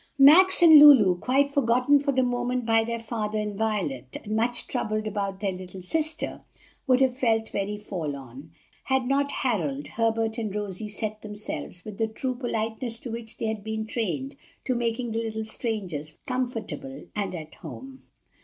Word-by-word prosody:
Max 345 +7 +7
and 320 -3 +10
Lulu, 225 -12 +8
quite 275 +5 +2
forgotten 260 +1 +3
for 280 0 0
the 260 -1 +2
moment 245 0 -1
by 225 0 +3
their 230 +1 -3
father 220 -2 -3
and 210 -1 -2
Violet, 195 - -2
and 215 +1 -3
much 235 +2 +1
troubled 215 0 -2
about 200 -2 -3
their 200 -2 0
little 185 0 -9
sister, 315 - -2 0.5
would 255 -1 +4
have 260 -2 +3
felt 225 -3 +1
very 200 +1 -3
forlorn, 145 - -6 0.4
had 265 -1 +1
not 280 +1 +1
Harold, 155 - -1
Herbert, 225 0 0
and 215 -3 -3
Rosie 210 0 -3
set 215 +1 -4
themselves, 210 -3 -6
with 210 -2 -8
the 225 - +2
true 255 +4 -3
politeness 230 -1 -3
to 240 - -6
which 230 -1 -6
they - - -3
had 220 -2 -3
been 220 0 -3
trained, 175 - -3 0.3
to 255 - 0
making 235 0 -2
the 225 +1 -1
little 220 -1 -4
strangers 185 - -4
comfortable 225 - -4
and 200 -3 -2
at 155 -2 -8
home. 265 0 -10
220 Hz, 170 wpm, -26 LUFS, 200-250 Hz, 0.5 s, and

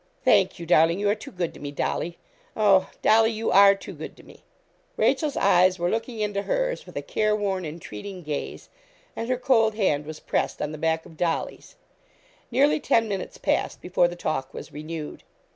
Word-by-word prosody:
'Thank - - +4
you, 170 - -7
darling. 165 +1 +4
You 205 0 +2
are - - +3
too 220 +6 -9
good 175 -5 -3
to - - -13
me, 145 - -5
Dolly. 170 +4 -2 0.4
Oh! 195 -3 +4
Dolly, 225 +1 +5
you 225 0 -2
are 200 +1 +7
too 195 - -9
good - - -9
to - - -16
me.' - - -17 0.6
Rachel's 300 -4 +1
eyes 185 -1 +4
were 175 0 0
looking 225 0 -3
into 205 -1 -1
hers - - -2
with - - -13
a - - -3
careworn, 205 -4 0
entreating 170 - -8
gaze, 150 -2 -5 0.5
and 230 - -4
her 255 - +1
cold 225 -4 +3
hand 150 -9 0
was 155 0 -7
pressed - - -2
on 150 - -2
the 155 - -7
back 160 +1 0
of 160 - -15
Dolly's. 170 -1 -3 0.7
Nearly 275 +5 +3
ten 230 -6 +2
minutes 195 -3 -4
passed - - -1
before 180 -1 +2
the 175 - -6
talk 135 -6 -3
was - - -9
renewed. 155 +1 -6
190 Hz, 190 wpm, -25 LUFS, 165-220 Hz, 0.7 s, are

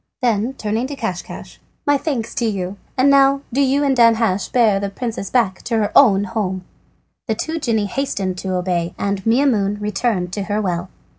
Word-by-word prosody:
Then 230 +1 +1
turning 220 +2 -2
to 285 - -6
Caschcasch: 190 -9 -6 0.3
"My 290 - +4
thanks 270 -6 -2
to 235 - -1
you, 195 -2 -3 0.2
and 260 +2 +4
now 275 0 +4
do 275 - +2
you 275 +1 +2
and 275 -2 +2
Danhasch 230 -5 +3
bear 220 -5 +3
the 200 0 -2
princess 220 -1 -5
back 225 -7 +1
to 230 - 0
her 210 -2 0
own 205 -8 +6
home." 200 -4 -3 0.6
The 220 - 0
two 320 +8 -3
genii 225 -7 0
hastened 195 -6 -2
to 190 -1 -3
obey, 175 -2 -1
and 200 -1 -2
Maimoune 225 -5 +2
returned 210 -3 -1
to 200 - -2
her 205 +1 -1
well. 180 -3 -2
215 Hz, 180 wpm, -19 LUFS, 195-255 Hz, 0.6 s, own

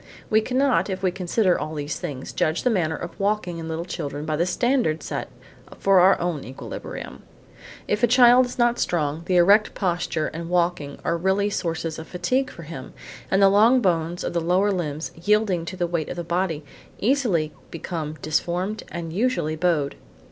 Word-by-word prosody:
We 220 0 +5
cannot, 260 0 +1
if 190 0 -4
we 185 - +2
consider 185 +1 +1
all 155 +1 -4
these 145 0 -4
things, 135 -3 -6
judge 155 +2 0
the 250 - +3
manner 165 -6 0
of 175 - -8
walking 200 -4 -1
in 165 - -6
little 160 +1 -3
children 150 -4 -5
by 155 -1 -1
the 170 +4 +1
standard 210 - +1
set - - -4 0.5
for 195 -1 +4
our 185 +2 +5
own 170 -5 -2
equilibrium. 130 - -8 0.7
If 210 +1 0
a 240 - +5
child 245 +1 +6
is 245 - -9
not 240 0 +2
strong, 155 -2 0
the 185 - +1
erect 200 +5 +5
posture 175 -4 -1
and 165 +1 -6
walking 170 -5 0
are 170 - +1
really 190 +4 +1
sources 165 -3 -3
of 160 - -8
fatigue 255 +10 0
for 170 - -11
him, 150 -5 -8 0.4
and 195 +1 +3
the 195 - +8
long 220 +6 +5
bones 175 -4 0
of - - -3
the 170 - 0
lower 185 +5 +2
limbs, 160 -4 -3
yielding 190 -1 +1
to 185 +2 -6
the 175 - 0
weight 170 -3 -2
of - - -4
the 175 - -4
body, 170 -3 -1 0.3
easily 205 - +1 0.2
become 160 -2 -5
deformed 175 +6 -1
and 165 -1 -5
usually 205 -7 0
bowed. 160 -4 +1
175 Hz, 185 wpm, -24 LUFS, 160-205 Hz, 0.7 s, the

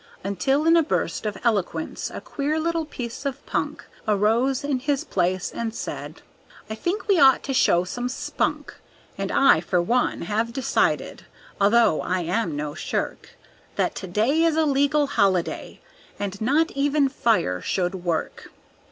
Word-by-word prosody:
Until 235 - 0
in 330 +1 +6
a 335 - +6
burst 290 -7 -1
of 205 -2 -4
eloquence 200 -8 -1
a - - -7
queer 300 +2 -2
little 330 0 -1
piece 245 -4 -7
of 275 -1 -4
punk - - -3 0.2
Arose 230 +7 +2
in 285 -3 0
his 280 +1 -1
place 185 0 -1
and 230 -1 -4
said, - - -6 0.5
"I - - -1
think 350 - -3
we 395 -4 +4
ought 265 -2 +6
to 270 - -3
show 175 -9 +4
some 245 +7 -4
spunk. 255 - -2 0.4
And - - -3
I 275 - +5
for 180 - 0
one 240 +9 +1
have 220 +6 -1
decided, 265 +1 0 0.3
although 210 -4 +4
I 185 0 -1
am 175 -1 -1
no 145 0 -3
shirk, - - -4 0.4
That - - 0
to 190 - -6
day 225 - +1
is 330 -1 +2
a 320 - +3
legal 285 +1 +2
holiday 200 -10 0 0.4
and 200 0 -5
not 295 +8 +2
even 285 +1 +2
fire 220 - +1
should 180 -1 -1
work. 175 -3 -3
235 Hz, 160 wpm, -24 LUFS, 190-285 Hz, 0.5 s, in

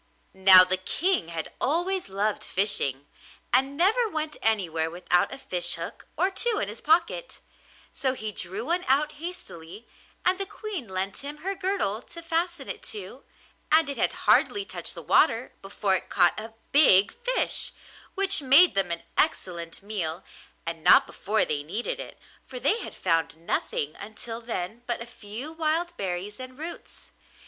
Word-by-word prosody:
Now 190 -1 +8
the 185 0 +1
King 335 - 0
had 165 -1 -6
always 350 - +1
loved 205 +2 -1
fishing, 145 -9 +2 0.5
and 270 +3 +2
never 435 +7 +3
went 310 -4 -2
anywhere 170 -8 0
without 180 +1 +1
a 270 - -6
fish 180 -9 -1
hook - - -8
or 380 - +2
two 460 +3 +1
in 200 - -1
his 215 - -9
pocket, 340 +10 +1 0.5
so 265 -1 0
he 215 -3 -4
drew 195 +3 -3
one 345 +4 +1
out 295 +3 +3
hastily, 210 - -8 0.4
and 365 +1 +3
the 390 - -2
Queen 395 - -6
lent 190 +1 -3
him 285 +1 -5
her 390 - 0
girdle 370 - -1
to 335 +6 -10
fasten 335 -3 -2
it - - -5
to, 210 +6 -6 0.5
and 315 -1 +5
it 280 - -4
had - - +1
hardly 405 -1 +3
touched - - -3
the - - -8
water 245 -5 +3
before 195 0 0
it - - -12
caught 175 -1 +3
a 220 +1 -9 0.2
big 205 -10 +6
fish, - - 0 0.4
which 390 -2 +4
made 280 +7 +7
them 195 -3 +1
an 170 0 -3 0.2
excellent 170 - -1
meal 180 -6 -4 0.4
and 165 -1 -5
not - - +7
before 215 +2 0
they 145 -1 -2
needed 190 +11 -4
it, - - -8 0.3
for 255 - -8
they 285 - +2
had - - -8
found 165 -2 0
nothing 155 -2 -2
until 225 +3 -7
then 225 -1 -5
but 240 - -1
a 235 - -7
few 235 +5 -7
wild 325 +2 -1
berries 190 +3 -4
and 255 0 -9
roots. 330 +3 -9
235 Hz, 165 wpm, -26 LUFS, -, 0.5 s, Now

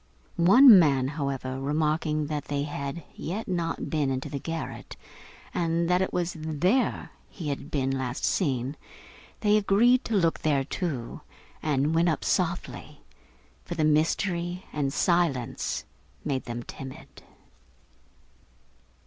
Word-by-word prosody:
One 205 +6 +9
man, 135 -5 +3
however, 135 -3 -3
remarking 150 +1 0
that 150 -1 -3
they 145 -1 -2
had 145 +2 -5 0.4
not 170 -3 -2
yet - - -5
been 150 -4 +1
into 130 0 -3
the 140 - -4
garret, 165 +3 -6 0.6
and 170 0 0
that 180 +1 +3
it 190 - 0
was 175 0 -1
there 165 - 0 0.2
he 165 -6 -6
had 140 - -4
been 135 -2 0
last 130 0 -2
seen, 135 -5 0 0.6
they 210 -1 +4
agreed 230 +5 +4
to 225 - -1
look 165 -3 +2
there 145 -3 +1
too, 140 -5 -4 0.4
and 150 0 +1
went 170 +1 +3
up 155 - -1
softly; 180 -1 -2 0.6
for 175 - -6
the 155 -2 +1
mystery 170 +3 0
and 140 -2 -1
silence 165 -7 0 0.4
made 135 -3 -2
them 120 0 -5
timid. 130 +1 -10
155 Hz, 130 wpm, -27 LUFS, 140-175 Hz, 0.6 s, One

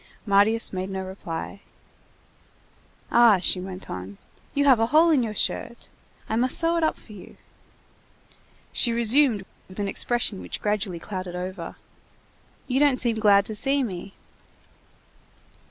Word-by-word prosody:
Marius 205 +2 +3
made 185 +1 -3
no 190 -1 -4
reply. 185 0 -7 1.5
"Ah!" 235 -4 +6
she 180 0 0
went 185 0 -7
on, 95 +2 -7 0.4
"you 285 0 +2
have 260 -5 +5
a 225 - +2
hole 320 +6 +4
in 290 -5 +3
your 220 -3 -3
shirt. 235 +3 -3 0.4
I - - -2
must 250 +3 +3
sew 335 0 +2
it 335 - 0
up 315 - +1
for 215 - -15
you." 200 - -13 1.4
She 240 - +1
resumed 235 -2 +3 0.2
with 185 - -13
an 205 -1 -2
expression 235 0 0
which - - -6
gradually 210 -3 -2
clouded 185 0 -6
over:— 180 -1 -6 0.9
"You 255 +1 0
don't 285 -3 +4
seem 235 -3 +1
glad 200 -2 +5
to 215 - -5
see 275 +6 0
me." 195 -3 -6
210 Hz, 145 wpm, -24 LUFS, 190-245 Hz, 1.5 s, Ah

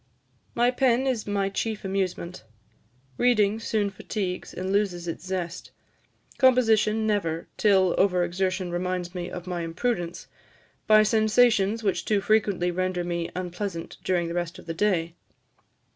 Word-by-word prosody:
My 240 +1 +3
pen 255 0 +2
is 250 -6 -1
my 200 -1 0
chief 215 +1 -3
amusement. 185 - -3 0.8
Reading 220 -3 +3
soon 215 -3 -1
fatigues, 190 -1 -4
and 185 +1 -4
loses 190 -4 0
its 165 +2 -5
zest; 180 -2 -4 0.7
composition 225 -4 +4
never, 170 -6 -1
till 190 -4 +3
over 180 -2 +3
exertion 185 +1 -1
reminds 180 0 -2
me 180 -1 -4
of 180 -1 -7
my 180 -2 -3
imprudence, 175 +1 -2 0.6
by 215 0 +7
sensations 220 0 +3
which 185 -4 0
too 210 +1 +1
frequently 200 -4 +1
render 185 0 -1
me 170 -1 -2
unpleasant 180 -1 -5
during 175 -2 0
the 170 - -4
rest 175 +1 -3
of - - -13
the 165 - -4
day." 170 -3 0
190 Hz, 140 wpm, -26 LUFS, 175-215 Hz, 0.8 s, by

